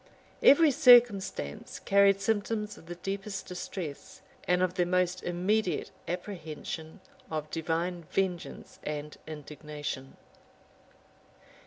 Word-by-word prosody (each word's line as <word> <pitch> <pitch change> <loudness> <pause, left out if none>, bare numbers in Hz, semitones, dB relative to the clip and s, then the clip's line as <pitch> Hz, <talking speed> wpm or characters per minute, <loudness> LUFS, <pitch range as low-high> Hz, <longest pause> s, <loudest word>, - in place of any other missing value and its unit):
Every 300 +2 +7
circumstance 235 - +4
carried 200 0 +4
symptoms 210 0 -1
of 165 - -16
the 175 - -6
deepest 195 +2 -4
distress, 180 -4 -7 0.2
and 180 +1 +3
of 180 -1 +1
the 180 -2 +1
most 180 0 +1
immediate 185 +4 0 0.2
apprehension 165 -3 -6 0.3
of 155 -1 -4
divine 165 +1 -2
vengeance 185 -3 -3
and 150 0 -4
indignation. 150 -3 -7
180 Hz, 100 wpm, -30 LUFS, 160-200 Hz, 0.3 s, Every